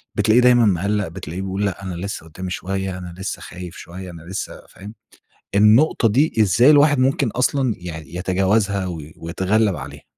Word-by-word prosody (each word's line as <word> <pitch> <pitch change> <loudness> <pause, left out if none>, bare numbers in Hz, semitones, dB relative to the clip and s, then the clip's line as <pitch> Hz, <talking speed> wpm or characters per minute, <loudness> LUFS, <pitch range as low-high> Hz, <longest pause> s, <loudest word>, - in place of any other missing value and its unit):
بتلاقيه 110 +3 +4
دايمًا 120 -1 +5
مقلّق، 100 +1 0
بتلاقيه 85 +1 -7
بيقول، 95 +1 -2
لأ 100 -1 -4
أنا 95 -2 -5
لسه 90 -2 -5
قُدّامي 90 +3 -7
شوية، 95 0 -3
أنا 90 -1 -8
لسه 95 0 -5
خايف 90 -1 -9
شوية، 90 +2 -9
أنا 85 -1 -11
لسه 95 +3 -6
فاهم؟ 100 +3 -11 0.6
النقطة 110 +6 +4
دي 140 +9 +2
إزاي 110 +6 +5
الواحد 145 -1 +5
ممكن 135 0 +2
أصلًا 130 0 +1
يعني 85 -2 -8
يتجاوزها 95 +2 +1
و 85 -3 -5 0.2
ويتغلّب 95 +4 0
عليها؟ 70 0 -9
95 Hz, 165 wpm, -21 LUFS, 90-110 Hz, 0.6 s, دايمًا